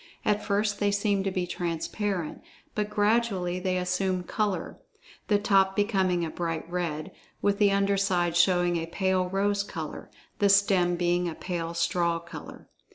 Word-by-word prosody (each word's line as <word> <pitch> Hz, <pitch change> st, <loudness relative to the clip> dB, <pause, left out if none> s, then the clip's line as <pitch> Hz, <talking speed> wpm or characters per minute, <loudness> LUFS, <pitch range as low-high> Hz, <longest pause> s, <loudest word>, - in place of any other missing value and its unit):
At 210 Hz, 0 st, +1 dB
first, 205 Hz, 0 st, 0 dB
they 205 Hz, -, +2 dB
seem 200 Hz, -1 st, +1 dB
to -, -, +2 dB
be 185 Hz, -1 st, -1 dB
transparent, 175 Hz, +1 st, -3 dB, 0.3 s
but 210 Hz, -1 st, -1 dB
gradually 205 Hz, -4 st, +1 dB
they 185 Hz, 0 st, 0 dB
assume 180 Hz, 0 st, 0 dB
color, 195 Hz, -2 st, -2 dB, 0.5 s
the 210 Hz, -, +4 dB
top 195 Hz, -2 st, +3 dB
becoming 190 Hz, -4 st, +1 dB
a 160 Hz, -, -5 dB
bright 165 Hz, -2 st, -3 dB
red, 170 Hz, -3 st, -3 dB, 0.3 s
with 200 Hz, 0 st, +2 dB
the 205 Hz, -1 st, +5 dB
under 200 Hz, 0 st, +2 dB
side 180 Hz, -4 st, +1 dB
showing 175 Hz, -1 st, +3 dB
a 165 Hz, 0 st, -3 dB
pale 185 Hz, +1 st, 0 dB
rose 200 Hz, +1 st, +1 dB
color, 200 Hz, -, -6 dB, 0.3 s
the 200 Hz, -2 st, +4 dB
stem 195 Hz, -3 st, +4 dB
being 175 Hz, 0 st, +1 dB
of 165 Hz, -, -5 dB
a -, -, -22 dB
pale 170 Hz, -2 st, -3 dB
straw 170 Hz, 0 st, +1 dB
color. 170 Hz, +1 st, -10 dB
185 Hz, 160 wpm, -27 LUFS, 175-200 Hz, 0.5 s, the